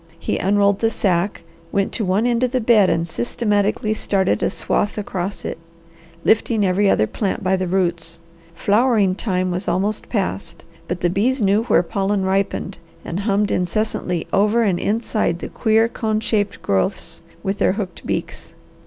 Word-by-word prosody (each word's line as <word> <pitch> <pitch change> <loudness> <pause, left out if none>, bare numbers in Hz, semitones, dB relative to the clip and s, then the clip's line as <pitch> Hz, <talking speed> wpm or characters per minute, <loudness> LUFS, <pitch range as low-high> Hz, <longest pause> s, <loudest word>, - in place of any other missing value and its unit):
He - - -2
unrolled 200 +1 +2
the 225 - +2
sack, 190 -2 0 0.3
went 200 -1 0
to 225 - -2
one 195 +4 +1
end 240 -1 +1
of 255 -1 +1
the 255 - +2
bed 220 -4 +4
and 165 +1 0
systematically 205 - 0
started 195 -3 0
a - - +2
swath 205 - -1
across 195 -1 -4
it, - - -4 0.7
lifting 220 -1 +3
every 195 +2 +2
other 110 - +3
plant 200 - -3
by 190 0 +2
the 185 -1 -2
roots. 170 -3 -1 0.4
Flowering 210 0 +3
time 185 -2 -1
was 180 +2 -3
almost 205 +3 -1
past, 200 -3 -3 0.2
but 180 0 -3
the 175 - +2
bees 245 +8 +1
knew 205 +1 +2
where 215 - +3
pollen 195 +1 -1
ripened, 195 0 -1 0.3
and 170 - -3
hummed 205 0 +1
incessantly 180 -1 -1
over 210 +4 +3
and 190 -5 +1
inside 215 -4 0
the - - -6
queer 220 0 +2
cone 220 -2 -1
shaped 205 -2 -1
growths 95 -1 -1 0.2
with 195 +1 -2
their - - +3
hooked 195 -3 -5
beaks. - - -4
200 Hz, 165 wpm, -20 LUFS, 185-215 Hz, 0.7 s, bed